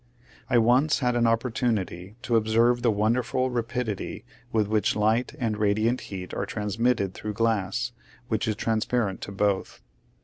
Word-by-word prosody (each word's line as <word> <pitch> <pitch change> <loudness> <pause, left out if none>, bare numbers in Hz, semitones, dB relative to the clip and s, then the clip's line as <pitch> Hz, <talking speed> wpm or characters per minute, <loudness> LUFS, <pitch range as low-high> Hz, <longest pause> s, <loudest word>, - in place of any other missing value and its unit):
I 125 - +4
once 125 +6 +4
had 125 -3 0
an 120 -1 +3
opportunity 110 -5 -1
to 120 - 0
observe 115 +2 +3
the 120 - +3
wonderful 120 +4 +1
rapidity 120 -3 -3 0.3
with 110 -2 +1
which 105 -1 +1
light 110 +4 +1
and 110 -3 -1
ra 105 - +2
diant 115 +4 +1
heat 95 -2 -7
are - - -2
transmitted 105 -1 0
through 105 0 -5
glass, 115 +1 0 0.4
which 110 0 -1
is 110 - 0
transparent 110 -2 -1
to - - -6
both. 100 -1 -1
115 Hz, 150 wpm, -26 LUFS, 105-120 Hz, 0.4 s, I